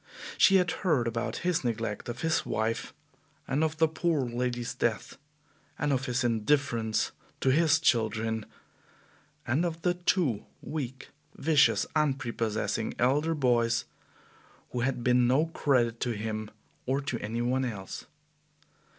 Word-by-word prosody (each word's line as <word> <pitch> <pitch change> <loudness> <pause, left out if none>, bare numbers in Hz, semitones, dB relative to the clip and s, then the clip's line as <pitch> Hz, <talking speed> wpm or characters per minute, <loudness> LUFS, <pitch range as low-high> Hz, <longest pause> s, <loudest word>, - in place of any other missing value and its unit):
She 195 - +6
had 180 -3 +4
heard 150 - +2
about 115 0 -2
his 180 -5 +1
neglect 115 -2 -3
of 120 +1 -5
his 160 0 +1
wife, 110 +1 -2 0.6
and 140 +3 +1
of 160 0 -1
the 160 0 +4
poor 160 -1 0
lady's 120 0 -2
death; - - -2 0.6
and 145 0 +1
of 130 0 -1
his 125 +1 0
indifference 115 -1 +1 0.3
to 135 - +3
his 160 +2 +4
children; 110 -5 +1 1.0
and 130 +8 +1
of 165 -1 -3
the 175 - +3
two 175 - 0 0.2
weak, 135 -4 -5 0.3
vicious, 150 -1 +3
unprepossessing 115 -7 -1
elder 145 +6 +2
boys 120 -4 +2 0.9
who 125 - -2
had 125 0 -1
been 125 0 +4
no 135 +6 +3
credit 125 -8 +1
to 120 - -1
him 110 0 -4 0.4
or 135 +2 +1
to 130 -4 -3
any 115 +3 -3
one 130 +2 +1
else. 105 -6 -5
125 Hz, 135 wpm, -29 LUFS, 115-150 Hz, 1.0 s, She